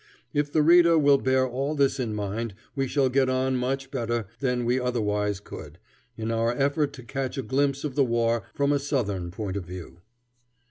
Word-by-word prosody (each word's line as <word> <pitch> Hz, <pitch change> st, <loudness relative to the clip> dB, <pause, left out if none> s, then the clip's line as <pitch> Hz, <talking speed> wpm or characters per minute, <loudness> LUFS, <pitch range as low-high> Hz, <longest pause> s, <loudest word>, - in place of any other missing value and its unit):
If 145 Hz, -1 st, 0 dB
the 155 Hz, +1 st, +3 dB
reader 170 Hz, +1 st, +6 dB
will 140 Hz, -2 st, +5 dB
bear 130 Hz, 0 st, +2 dB
all 135 Hz, +5 st, -2 dB
this 140 Hz, -1 st, +2 dB
in 115 Hz, -4 st, -2 dB
mind 105 Hz, +1 st, -3 dB, 0.2 s
we 135 Hz, -1 st, 0 dB
shall 140 Hz, 0 st, +2 dB
get 130 Hz, 0 st, +2 dB
on 130 Hz, 0 st, +1 dB
much 135 Hz, +2 st, -2 dB
better 120 Hz, -3 st, -1 dB
than 125 Hz, -3 st, 0 dB
we 125 Hz, +2 st, +2 dB
otherwise 105 Hz, -5 st, -1 dB
could, 80 Hz, -5 st, -10 dB, 0.4 s
in 110 Hz, 0 st, -2 dB
our 115 Hz, +1 st, +1 dB
effort 140 Hz, +3 st, +1 dB
to 125 Hz, -, -10 dB
catch 135 Hz, +2 st, -4 dB
a 135 Hz, -, -2 dB
glimpse 140 Hz, +1 st, 0 dB
of 150 Hz, -3 st, -3 dB
the 140 Hz, +1 st, +3 dB
war 115 Hz, -3 st, 0 dB
from 140 Hz, 0 st, +2 dB
a 145 Hz, -, +2 dB
Southern 105 Hz, -11 st, -2 dB
point 100 Hz, +1 st, -4 dB
of 95 Hz, -, -5 dB
view. 90 Hz, -1 st, -9 dB
130 Hz, 195 wpm, -26 LUFS, 115-140 Hz, 0.4 s, reader